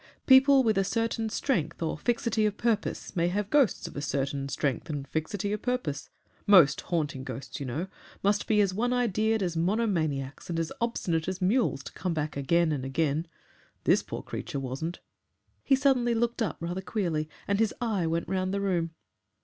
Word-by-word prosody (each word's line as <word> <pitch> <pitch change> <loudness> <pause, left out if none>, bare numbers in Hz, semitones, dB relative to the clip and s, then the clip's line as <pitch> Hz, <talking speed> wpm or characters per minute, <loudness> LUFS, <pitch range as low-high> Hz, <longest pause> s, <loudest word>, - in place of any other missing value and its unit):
People 265 0 +7
with 215 -4 +2
a - - +3
certain 225 +2 -1
strength 180 - -1
or 160 -2 -1
fixity 230 +2 +1
of 210 - -3
purpose 225 -3 -1
may 170 -1 +2
have 200 +3 -2
ghosts 285 -7 +3
of - - -10
a 145 - -3
certain 140 0 -2
strength 135 +1 -2
and 145 -2 -4
fixity 195 +7 -2
of 210 - -3
purpose 245 - -2 0.4
most 175 -9 +6
haunting 150 -6 -2
ghosts, 130 +1 -6
you 140 - -4
know, 150 +9 -2 0.4
must 205 +1 +2
be 210 -1 +4
as 195 -2 +1
one 240 +5 0
idea'd 220 -3 +1
as 175 -2 -2
monomaniacs 165 - -1
and 165 -1 -1
as 165 -1 -2
obstinate 170 -9 -1
as 185 0 -3
mules 195 - +1
to - - -9
come 180 -3 -2
back 150 -1 -2
again 160 +4 +2
and 140 -4 -2
again. 150 +4 0 0.6
This - - +4
poor - - -6
creature 140 - -5
wasn't." 135 +6 -4 0.7
He 270 - +4
suddenly 260 -3 +2
looked 235 +1 0
up 205 -9 -1
rather 175 +3 -3
queerly, 170 -6 -2 0.2
and 200 0 +1
his 225 -2 +3
eye 215 -8 0
went 165 +1 -1
round 185 +1 -1
the - - 0
room. 170 -4 -1
185 Hz, 185 wpm, -28 LUFS, 155-220 Hz, 0.7 s, People